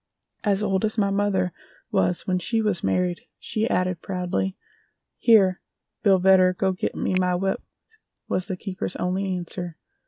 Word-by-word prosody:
As 205 -1 +1
old 195 -1 +1
as 215 +1 0
my 200 -2 +2
mother 195 -3 +1 0.4
was 180 - +1
when 185 -1 +1
she 225 +6 +1
was 210 -5 0
married," 180 -1 0 0.2
she 220 +2 -1
added 185 -2 0
proudly. 185 0 -2 0.6
"Here, 195 -6 +5 0.4
Bill 195 -3 +5
Vedder, 185 0 +5
go 190 +1 +1
git 185 - -3
me - - -1
my 180 -1 +2
whip," 190 +2 -1 0.7
was 185 - -1
the 190 -3 -3
keeper's 185 -1 -4
only 185 +1 -1
answer. 175 -1 -6
185 Hz, 155 wpm, -24 LUFS, 180-200 Hz, 0.7 s, Here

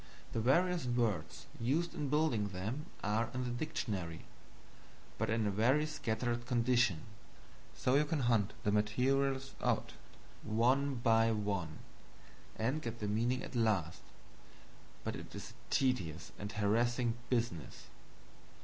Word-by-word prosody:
The 115 - 0
various 170 +4 +3
words 110 -10 -1
used 150 +9 +1
in 145 -2 -3
building 150 -8 +2
them 105 - -4 0.2
are 110 +2 +1
in 125 - -1
the 125 - -2
dictionary, 110 - -3 0.9
but - - 0
in 110 0 +1
a 100 - +1
very 125 +9 +3
scattered 120 -5 -2
condition; 120 -8 +3 0.7
so 125 - +1
you 145 +2 +5
can 150 -1 -1
hunt 115 -5 +2
the 105 - +2
materials 130 +6 +1
out, - - 0 0.5
one 130 +6 +2
by 115 -1 +4
one, 100 -7 -2 0.8
and 130 +8 0
get 115 -4 -3
at - - -17
the 105 - -2
meaning 120 +5 +1
at - - -8
last, 100 -8 +1 1.0
but - - -2
it - - -9
is - - -7
a - - -22
tedious 90 - 0
and 105 +1 -5
harassing 115 +3 +2 0.2
business. 115 - -2
120 Hz, 135 wpm, -35 LUFS, 105-130 Hz, 1.0 s, you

